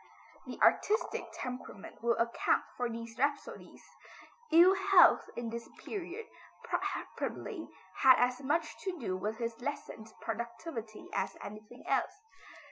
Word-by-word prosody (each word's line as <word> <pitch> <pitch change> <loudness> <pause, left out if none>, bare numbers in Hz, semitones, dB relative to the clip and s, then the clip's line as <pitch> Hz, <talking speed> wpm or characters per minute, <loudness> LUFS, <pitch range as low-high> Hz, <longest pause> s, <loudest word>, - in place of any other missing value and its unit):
The - - -6
artistic 430 +3 +3
temperament 250 -5 -7
will 235 0 +2
account 235 0 +2
for 245 -1 -1
these 230 0 -6
rhapsodies. 285 +2 -2 0.7
Ill 345 +4 +8
health 385 -1 +6
in 235 -1 -4
this 235 0 -6 0.2
period 400 +2 -5 0.4
probably 400 -9 -3 0.3
had 260 -1 +8
as 250 +1 +2
much 310 +4 0
to 375 -2 -3
do 210 - -2
with 210 +4 -3
his 230 0 -4
lessened 240 -5 -5
productivity 230 0 -5
as 195 0 -1
anything 215 +4 -10
else. 275 +8 +1
245 Hz, 125 wpm, -32 LUFS, 225-330 Hz, 0.7 s, Ill